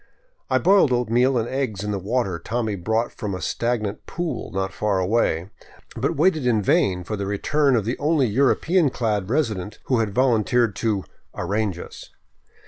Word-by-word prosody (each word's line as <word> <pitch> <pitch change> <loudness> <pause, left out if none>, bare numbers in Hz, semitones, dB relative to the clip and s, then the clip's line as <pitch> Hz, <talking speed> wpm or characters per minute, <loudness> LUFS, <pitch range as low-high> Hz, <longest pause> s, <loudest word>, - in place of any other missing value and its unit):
I - - +3
boiled 190 -7 +4
oatmeal 125 +2 +2
and 115 0 0
eggs 125 -7 -2
in 105 - -2
the 100 - -2
water 100 -3 -1
Tommy 115 -3 -2
brought 110 +6 -1
from 105 -4 -4
a - - -5
stag 115 +5 -1
nant 100 0 -5
pool 175 -1 -4
not 95 0 -2
far 105 -2 0
away, 95 -2 0 0.4
but 140 +8 -1
waited 155 -3 +2
in 110 -4 +2
vain 90 -1 +2
for 105 - -4
the 100 -1 -4
return 135 +7 +1
of 110 -4 0
the 120 +3 -2
only 150 -2 +2
European 140 - +2
clad 105 -6 -1
resident, 110 - -1
who 125 -3 +1
had 110 -2 +1
volunteered 120 -3 +2
to 105 -4 0 0.2
" - - -33
arrange 105 -3 -1
us." - - -10
115 Hz, 180 wpm, -23 LUFS, 100-130 Hz, 0.4 s, boiled